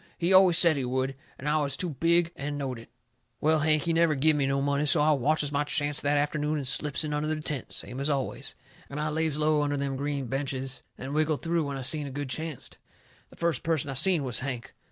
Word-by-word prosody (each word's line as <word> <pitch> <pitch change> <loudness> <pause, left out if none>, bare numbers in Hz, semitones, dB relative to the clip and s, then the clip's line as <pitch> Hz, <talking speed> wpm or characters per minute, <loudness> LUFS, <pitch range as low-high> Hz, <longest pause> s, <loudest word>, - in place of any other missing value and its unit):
He 175 +2 +2
always 185 -3 +7
said 170 -4 +5
he 135 - -1
would. 130 +2 -1 0.2
And 135 - -10
now 150 +1 +2
I - - +1
was 140 -1 -2
too 180 -3 -2
big 170 +4 +2
and 145 +1 -4
knowed 130 -4 -3
it. 115 - -14 0.5
Well, 155 +1 +3
Hank, 155 -1 +2
he 170 - 0
never 165 -2 +3
give 155 +3 +3
me 140 -2 +1
no 135 0 +1
money, 140 +1 +1
so 150 - +4
I 150 +1 +4
watches 145 +1 +1
my 145 0 +1
chancet 145 0 -1
that 145 0 +2
afternoon 150 +1 0
and 140 -3 -3
slips 145 +3 -1
in 150 -1 -3
under 150 +1 -1
the 155 0 -1
tent 150 -4 -4
the - - -14
same 125 - -6
as 140 +2 -1
always. 135 0 -2 0.3
And 140 - -5
I 155 +1 -1
lays 155 -1 0
low 155 0 +2
under 145 0 0
them 140 -1 -2
green 140 -1 -2
benches 135 +1 -3 0.2
and 135 +2 -6
wiggled 155 -1 0
through 165 -2 0
when 140 -1 -4
I 135 - -5
seen 150 +2 +1
a - - -5
good 140 0 -5
chancet. 155 0 -5 0.5
The - - -16
first 170 -4 0
person 155 -4 -1
I - - -3
seen 155 +3 +2
was 125 -3 -2
Hank. 125 -3 -5
145 Hz, 255 wpm, -28 LUFS, 135-155 Hz, 0.5 s, always